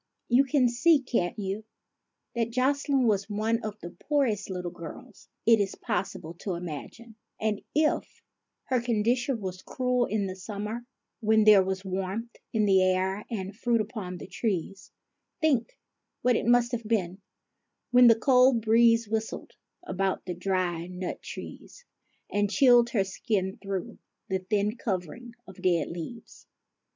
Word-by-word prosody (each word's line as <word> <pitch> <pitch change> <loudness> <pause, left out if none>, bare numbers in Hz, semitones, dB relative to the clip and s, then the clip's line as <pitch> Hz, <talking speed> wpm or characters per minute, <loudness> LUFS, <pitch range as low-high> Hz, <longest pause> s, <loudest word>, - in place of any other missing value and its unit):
You 255 +3 +5
can 270 -2 +3
see, 285 +7 +4
can't 230 -9 -1
you, 200 +1 -3 0.7
that 230 -1 0
Jocelyne 270 +2 +1
was 205 -2 +1
one 220 +2 0
of 215 -1 -6
the 175 - -7
poorest 260 -10 -1
little 180 -2 -4
girls 165 -2 -11 0.2
it 230 -1 +6
is 200 -1 -1
possible 180 -4 -3
to 190 -4 -3
imagine; 180 +7 -8 0.2
and, 215 -1 -1
if 305 0 0 0.4
her 255 -2 0
con 230 -3 0
dition 245 +2 +1
was 185 -3 -6
cruel 250 -1 0
in 210 -1 -1
the 185 -1 -4
summer, 210 +5 -6 0.2
— - - -57
when 220 0 +4
there 210 -2 +8
was 190 +1 -3
warmth 195 +5 -4 0.2
in 215 -2 +2
the 190 -2 +5
air 185 +2 +1
and 195 -3 -4
fruit 235 +1 +1
upon 210 -4 -4
the - - -8
trees, 195 -1 -3 0.2
— - - -55
think 280 -8 +1 0.5
what 250 -1 +4
it - - -1
must 240 0 +4
have 230 -3 -4
been 195 -4 -1 0.7
when 245 0 +8
the 230 - +8
cold 250 0 +5
breeze 230 0 +4
whistled 220 +1 -3 0.3
about 190 - -1
the 180 - -3
dry 175 -2 -1
nut 180 0 -5
trees, - - -10 0.5
and 205 0 +1
chilled 240 +1 +5
her 210 -5 +1
skin 195 -1 -2
through 195 -2 -5 0.3
the 190 0 0
thin 205 +3 0
covering 225 +4 -4
of 190 -1 -12
dead 175 -4 +2
leaves. 175 +8 -9
215 Hz, 155 wpm, -28 LUFS, 190-240 Hz, 0.7 s, there